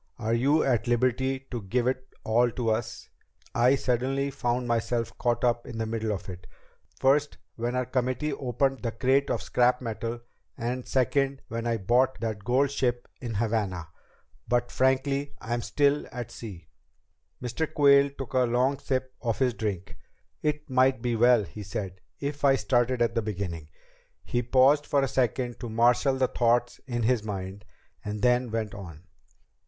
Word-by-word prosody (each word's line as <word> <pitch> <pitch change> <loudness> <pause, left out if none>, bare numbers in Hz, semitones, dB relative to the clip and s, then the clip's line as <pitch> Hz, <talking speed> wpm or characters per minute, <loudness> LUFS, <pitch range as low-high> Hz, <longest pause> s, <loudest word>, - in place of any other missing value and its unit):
Are 115 -1 -1
you 140 +7 +3
at 120 -4 +1
liberty 130 +2 +1
to 120 -3 -3
give 120 +5 -1
it 130 +1 -1 0.2
all 120 +2 +3
to 115 -3 0
us? 110 +1 -3 0.5
I 125 +3 +4
suddenly 135 +2 0
found 125 -1 -1
myself 115 0 -1
caught 120 0 0
up 120 -1 +1
in 120 - -7
the 115 - -1
middle 110 -1 -2
of 95 -4 -4
it 90 -1 -9 0.5
first 145 +2 +2 0.2
when 120 +2 -2
our 125 0 0
committee 130 +3 -1
opened 135 +1 0
the 120 - -1
crate 135 +4 +2
of - - -1
scrap 125 0 +2
metal, 115 0 -4 0.4
and 125 +2 -3
second 135 +2 +1
when 115 0 -3
I 115 -1 +1
bought 120 +6 +2
that 110 -2 -3
gold 130 +5 +2
ship 120 -3 -1
in 120 -3 -4
Havana 100 -6 -1 0.6
but 120 0 +1
frankly 135 +2 +1
I'm 120 +1 -2
still 145 +3 +1
at 120 -3 -6
sea." 95 -9 -9 0.7
Mr. 125 +6 -3
Quayle 140 -1 +5
took 135 -2 -8
a 130 - +3
long 125 +3 +2
sip 130 -1 -2
of 115 -3 -1
his 130 -2 +2
drink. 100 -6 -4 0.4
"It 150 0 -1
might 130 -2 +2
be 120 -1 0
well," 120 -1 +5
he 105 - -9
said, 100 -2 -5 0.2
"if 145 +1 -4
I 135 -1 +6
started 120 -2 +1
at 115 - 0
the 115 - +1
beginning." 90 -7 -4 0.5
He 120 - -1
paused 130 +4 +4
for 140 -1 +2
a - - +1
second 125 -1 -1
to 120 - -5
marshal 120 +4 +3
the 130 -1 +2
thoughts 120 0 +1
in 120 -2 -2
his 120 0 +2
mind, 100 -1 -6 0.4
and 105 0 -5
then 125 0 +3
went 110 -2 -3
on. 85 -5 -9
120 Hz, 170 wpm, -27 LUFS, 115-130 Hz, 0.7 s, I